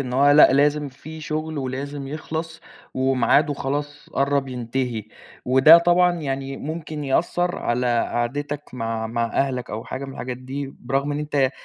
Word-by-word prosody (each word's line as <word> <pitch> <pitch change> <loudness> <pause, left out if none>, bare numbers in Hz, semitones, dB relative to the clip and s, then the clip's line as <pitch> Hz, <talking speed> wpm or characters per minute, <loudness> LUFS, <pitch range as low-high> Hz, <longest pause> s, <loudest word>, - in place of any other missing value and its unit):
إن 130 -2 -4
هو 140 +3 +5
لأ 145 -1 +7
لازم 145 +1 +2
في 155 +4 -11
شُغل 155 0 -3
ولازم 135 +1 -4
يخلص 160 +2 -5 0.3
ومعاده 135 +3 +2
خلاص 145 +2 -4
قرَّب 140 0 +1
ينتهي 125 -2 -3 0.4
وده 130 +6 +8
طبعًا 175 +1 +4
يعني 135 -1 -3
ممكن 155 0 -5
يأثّر 175 +5 0
على 125 +1 0 0.3
قعدتك 145 +5 -2
مع 115 -2 -3
مع 115 +1 -1
أهلك 125 +1 -1
أو 110 +2 -5
حاجة 130 +2 -5
من 135 - -7
الحاجات 125 -1 -5
دي 135 +2 -6
برغم 135 +3 -1
إن 145 - -2
أنت 145 -3 +1
140 Hz, 155 wpm, -23 LUFS, 130-150 Hz, 0.4 s, وده